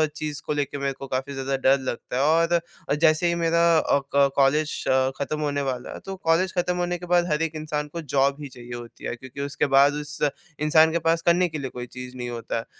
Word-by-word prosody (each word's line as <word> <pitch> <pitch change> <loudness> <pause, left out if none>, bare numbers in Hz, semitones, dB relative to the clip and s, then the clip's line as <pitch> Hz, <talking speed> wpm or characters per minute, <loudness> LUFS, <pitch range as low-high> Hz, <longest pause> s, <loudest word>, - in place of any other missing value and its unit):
चीज़ 150 -1 -4
को - - -1
लेके 145 -1 -2
मेरे 140 0 -1
को 135 - -7
क़ाफी 135 +2 -3
ज़्यादा 135 0 -2
डर 135 +1 +3
लगता 130 -1 -5
है - - +2
और 165 0 +1
जैसे 160 +1 +4
ही 170 - +1
मेरा 170 0 +2 0.2
अ, 140 - +2 0.2
क 140 -1 +5
कॉलेज 145 +2 +2 0.4
ख़त्म 150 +2 -3
होने 145 -1 -1
वाला 130 -3 -4
है - - -8
तो 195 - -5
कॉलेज 185 +1 +1
ख़त्म 180 0 +1
होने 175 0 -1
के 180 - -9
बाद 175 0 +3
हर 150 +1 +1
एक 165 -1 -1
इंसान 150 -1 -3
को 170 - -4
जॉब 140 -1 +1
ही - - -5
चाहिए 120 -1 -10
होती 120 -1 -9
है। - - -3
क्योंकि 130 +3 -9
उसके 140 -1 -1
बाद 140 +1 +6
उस 150 -1 -6 0.4
इंसान 155 +1 +5
के 170 - 0
पास 165 0 +1
करने 175 +2 +3
के 155 - -5
लिए 135 -3 -4
कोई 125 -1 -7
चीज़ 125 +1 -9
नहीं 120 -1 -4
होता 115 -1 -4
है। 115 - -4
150 Hz, 240 wpm, -24 LUFS, 135-165 Hz, 0.4 s, बाद